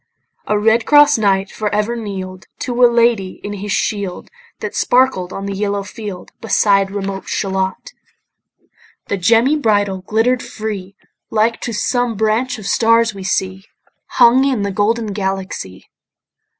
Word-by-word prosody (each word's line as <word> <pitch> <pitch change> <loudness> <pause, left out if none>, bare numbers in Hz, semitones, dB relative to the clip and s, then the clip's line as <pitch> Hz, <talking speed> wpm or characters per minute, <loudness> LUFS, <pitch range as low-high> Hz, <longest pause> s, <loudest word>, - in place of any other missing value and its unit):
A 210 - +1
red 220 +2 +2
cross 295 0 +6
knight 195 -2 +1
for 215 -1 -3
ever 210 +3 0
kneel'd 190 -4 -6
To 245 0 0
a 245 - +8
lady 230 -5 +1
in 205 - -5
his 205 0 -5
shield, 200 -3 -2 0.3
That - - -5
sparkled 245 -8 +2
on 195 - -6
the 200 - -3
yellow 200 0 -2
field, 205 -2 -8
Beside 200 -3 +2
remote 195 -1 -5
Shalott. 190 -1 -2 1.2
The 200 - 0
gemmy 230 +10 +3
bridle 205 -7 +1
glitter'd 225 +6 +1
free, 205 -3 -6 0.3
Like 225 +1 +1
to 240 - -3
some 245 +1 -1
branch 220 +5 0
of 215 - -10
stars 230 +2 +3
we 195 -1 -8
see 190 0 -2 0.4
Hung 250 +3 +5
in 260 -7 0
the 200 - -2
golden 215 +2 0
Galaxy. 190 - -4
210 Hz, 145 wpm, -17 LUFS, 195-230 Hz, 1.2 s, a